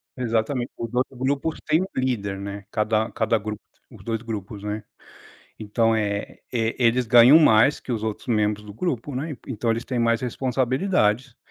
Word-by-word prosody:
exatamente, 120 +1 -1
os 115 0 -5
outros 125 +1 -1
grupos 140 +5 -1
têm 155 +2 +3
um - - -1
líder, 105 -7 -1
né. 100 0 -6
Cada 110 +1 +1
cada 115 0 +1
grupo, 105 0 -6 0.3
os - - -14
2 115 -1 -2
grupos, 105 -3 -6
né. 105 +1 -4 0.8
Então 115 +1 +1
é 105 -2 -2
é, 115 -2 0
eles 120 +1 +3
ganham 120 +6 +8
mais 140 -2 +5
que 125 - -5
os 110 -2 -2
outros 110 -1 -4
membros 105 -2 +1
do 105 - -9
grupo, 140 - -3
né, 145 +3 -4
então 115 -2 -2
eles 115 +1 -1
têm 125 -2 -3
mais 115 -1 +2
responsabilidades. 130 - 0
115 Hz, 170 wpm, -24 LUFS, 110-130 Hz, 0.8 s, ganham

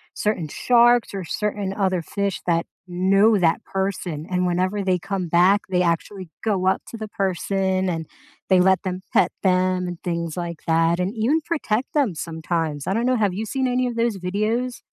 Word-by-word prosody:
certain 210 -7 -1
sharks 240 - +3
or 195 -2 -4
certain 205 +1 -2
other 185 -3 0
fish 200 +3 -3
that 170 -1 +2 0.2
know 195 +4 +3
that 165 -3 +2
person, 185 -5 -3
and 180 0 +1
whenever 185 +3 0
they 185 -1 +2
come 185 0 -3
back, 180 +5 +4
they 180 -1 +2
actually 175 +2 -2
go 195 -4 0
up 190 - +2
to 230 - -8
the 215 -1 -5
person 190 0 0
and 165 -3 -3 0.4
they 185 -1 +5
let 190 +1 +4
them 185 0 -4
pet 180 - +4
them 185 -1 +2
and 175 -1 -6
things 170 -2 -3
like 170 -2 -5
that, 165 +1 +2
and 185 +4 -1
even 255 +9 +2
protect 265 -7 -2
them 265 - +1
sometimes. 160 -2 -3
I 190 - +1
don't 235 +2 0
know, 255 0 +3
have 205 -5 +1
you 220 +2 -3
seen 260 +3 -1
any 250 0 +1
of 240 -1 -3
those 230 -3 0
videos? 215 +7 -2
190 Hz, 190 wpm, -23 LUFS, 175-210 Hz, 0.4 s, they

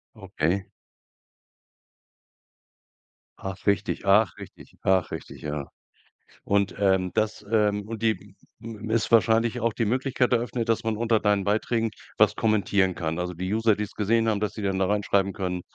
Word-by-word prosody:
Okay. 95 -2 -2 2.7
Ach, 95 +1 -7
richtig. 100 -2 +1
Ach, 100 -2 +4
richtig. - - -12
Ach, 95 -2 +2
richtig, - - -8
ja. 75 -2 -4 0.8
Und, 100 0 +1
ähm 95 -2 +2
das, 110 -1 -1
ähm 105 -2 +2
und 115 -1 -6
die 110 -3 -1 0.3
m 110 -1 -7
ist 115 +1 0
wahrscheinlich 115 +1 +3
auch 115 -1 0
die 115 - -1
Möglichkeit 125 +2 0
eröffnet, 120 -1 0
dass 115 - +1
man 110 -1 0
unter 115 0 +1
deinen 105 -2 +2
Beiträgen 110 +2 0 0.3
was - - +4
kommentieren 100 -4 +1
kann. 80 0 -3
Also 90 0 -3
die 95 +3 -3
User, 110 -1 +3
die's 105 0 -4
gesehen 115 +2 +1
haben, 105 -2 0
dass 105 -1 -2
sie 110 - -7
dann 95 -1 -1
da 95 - +2
reinschreiben 100 -1 +1
können: 90 -2 -3
105 Hz, 155 wpm, -26 LUFS, 95-115 Hz, 2.7 s, Ach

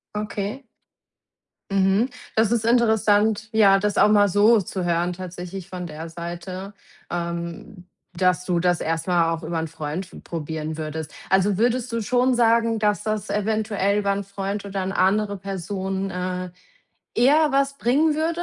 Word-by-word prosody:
Okay. 210 +4 -4 1.1
Mhm. 195 +5 +2 0.3
Das 220 -1 +3
ist 235 -2 +1
interessant, 220 -2 +3
ja, 205 -3 +5
das 210 0 -1
auch - - +6
mal 205 -1 +5
so 210 +3 +5
zu 185 0 -4
hören 175 +1 +1
tatsächlich 180 +1 -7
von 180 -1 -5
der 160 +1 -7
Seite, 175 +4 -7 0.4
ähm, 170 +2 -5 0.3
dass 180 -1 +2
du 180 -2 +1
das 175 -1 +2
erst 165 +1 -2
mal 170 -2 +2
auch 165 0 -6
über 165 +1 -2
'n 160 - -3
Freund 160 +3 -5
f - - -12
probieren 160 -1 -5
würdest. 155 -1 -5 0.2
Also, 190 +1 +3
würdest 245 +2 +1
du 230 0 -1
schon 250 +4 +2
sagen, 230 -1 +3
dass 210 -1 +1
das 215 -2 -2
eventuell 210 -1 0
über 200 -1 +1
'n 200 0 -3
Freund 200 +1 -4
oder 195 -1 -3
'ne 190 - -3
andere 200 +2 +2
Person, 195 0 -4
äh, 180 0 -3 0.7
eher 295 +5 +4
was 275 0 +1
bringen 295 +6 +2
würde? 330 +3 -1
195 Hz, 160 wpm, -23 LUFS, 175-220 Hz, 1.1 s, auch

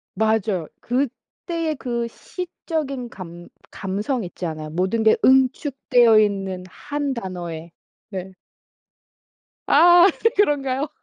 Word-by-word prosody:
맞아요. 215 -6 0
그때의 305 +5 -3
그 235 -3 -3
시적인 300 -5 -5
감 175 -4 -10 0.2
감성 205 +5 -3
있잖아요. 160 -3 -5
모든 190 +7 0
게 220 - +5
응축되어 255 -3 +4
있는 195 -3 -1
1 285 +3 -4
단어의. 175 -5 -6 0.4
네. 190 -1 -6 1.3
아 350 +1 +7 0.3
그런가요? 285 -6 +1
230 Hz, 190 characters per minute, -22 LUFS, 185-275 Hz, 1.3 s, 아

